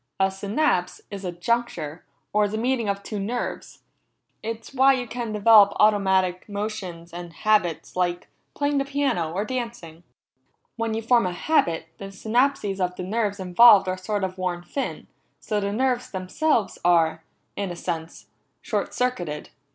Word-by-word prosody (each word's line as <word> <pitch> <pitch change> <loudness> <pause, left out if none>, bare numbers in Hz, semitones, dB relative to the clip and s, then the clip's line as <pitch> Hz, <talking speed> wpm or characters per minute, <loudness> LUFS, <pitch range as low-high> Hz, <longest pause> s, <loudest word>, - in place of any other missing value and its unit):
"A 190 0 +3
synapse 195 -2 0
is 200 -1 -6
a 180 - -3
juncture, 175 -4 -2 0.3
or 210 0 +3
the 215 +2 -4
meeting 235 -2 0
of 200 0 -2
two 210 - -5
nerves. 230 +5 -4 0.6
It's 225 +3 -6
why 270 +1 +5
you 255 -2 -2
can 235 -1 -4
develop 210 -1 +6
automatic 190 -3 +3
motions 195 -5 -5
and 175 -1 -7
habits, 205 -4 0
like 180 -1 -1 0.3
playing 285 -1 +1
piano, 275 - 0
or 195 +5 -2
dancing. 230 -10 -5 0.7
When 230 -1 -2
you 225 - -3
form 235 -3 +3
a 180 - -3
habit, 170 - +1
the 195 - -6
synapses 215 +1 0
of 180 -1 -1
the 180 - -5
nerves 205 +1 -1
involved 195 +2 +7
are 185 - 0
sort 195 +2 -3
of 185 0 -3
worn 180 -1 -2
thin, 270 +10 -4 0.3
so 210 -2 -2
the 200 0 -2
nerves 255 +2 0
themselves 205 +5 0
are, 165 -2 +3 0.3
in 200 -2 -3
a 175 - -5
sense, 165 -2 -5 0.3
short - - -3
circuited. 175 -12 -2
200 Hz, 155 wpm, -24 LUFS, 180-235 Hz, 0.7 s, involved